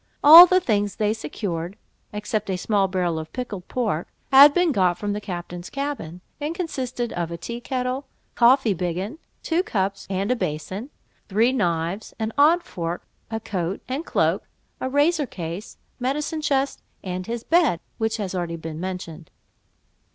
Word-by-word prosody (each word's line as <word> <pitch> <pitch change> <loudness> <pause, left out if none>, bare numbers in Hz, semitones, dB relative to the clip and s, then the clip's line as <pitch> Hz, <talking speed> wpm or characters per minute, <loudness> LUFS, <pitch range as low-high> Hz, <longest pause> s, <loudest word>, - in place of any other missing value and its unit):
All 330 +5 +12
the 370 +1 +4
things 205 - 0
they 210 0 +1
secured 175 -1 -4 0.3
(except 210 0 -3
a 185 - 0
small 200 +1 +1
barrel 180 -3 -1
of 160 0 -8
pickled 215 -8 -5
pork) 215 -10 -1 0.2
had 280 +2 +10
been 355 +2 +2
got 185 -7 +2
from 205 -1 -2
the 210 - -4
captain's 175 -2 -6
cabin, 275 - -4 0.2
and 305 +3 -3
consisted 255 -9 -3
of 170 -1 -2
a 170 - -5
tea 235 +8 -6
kettle, 255 +2 -3 0.3
coffee 240 -2 +4
biggin, 185 - -3 0.2
two 335 +1 +1
cups, 195 - -2
and 195 +4 -1
a - - +3
basin; 190 - -4 0.4
three 220 +5 +3
knives, 175 -4 -1
an 220 0 -3
odd 320 +5 +5
fork, 170 - -5 0.2
a 225 0 -3
coat 185 -3 -3
and 265 +5 -3
cloak, - - 0 0.3
a 260 - -2
razor 290 +2 +2
case, 175 +1 -7 0.2
medicine 295 +5 -2
chest, 275 -2 0 0.2
and 185 0 -4
his 235 0 -4
bed, 325 - +3 0.2
which 220 0 0
has 200 -4 -3
been 185 - -2
already 170 -1 -3 0.2
mentioned. 170 -1 -6
210 Hz, 160 wpm, -23 LUFS, 180-265 Hz, 0.4 s, All